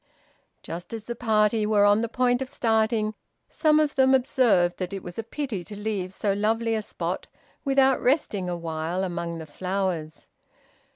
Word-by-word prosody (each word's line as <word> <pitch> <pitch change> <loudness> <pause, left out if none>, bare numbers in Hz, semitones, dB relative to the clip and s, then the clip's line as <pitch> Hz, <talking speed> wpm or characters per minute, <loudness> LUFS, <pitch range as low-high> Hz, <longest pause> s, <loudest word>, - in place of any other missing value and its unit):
Just 175 +7 -6
as 220 - -7
the 235 - -3
party 220 -2 +2
were 210 -1 +4
on 205 +1 +5
the 230 - -2
point 245 +1 +1
of 265 - -3
starting, 220 -2 +1 0.3
some 310 -1 +3
of 300 -1 +1
them 265 -1 +5
observed 235 -9 +2
that 185 0 -3
it 195 - -5
was 175 +4 -7
a - - -2
pity 230 -6 -4
to 210 - -8
leave 205 -3 -3
so 200 +1 -1
lovely 225 +3 0
a 220 - 0
spot - - -4 0.4
without 270 -1 +3
resting 215 - +1
awhile 170 +1 -3
among 170 -2 -3
the 160 - -7
flowers. 175 -2 -3
215 Hz, 170 wpm, -26 LUFS, 180-240 Hz, 0.4 s, on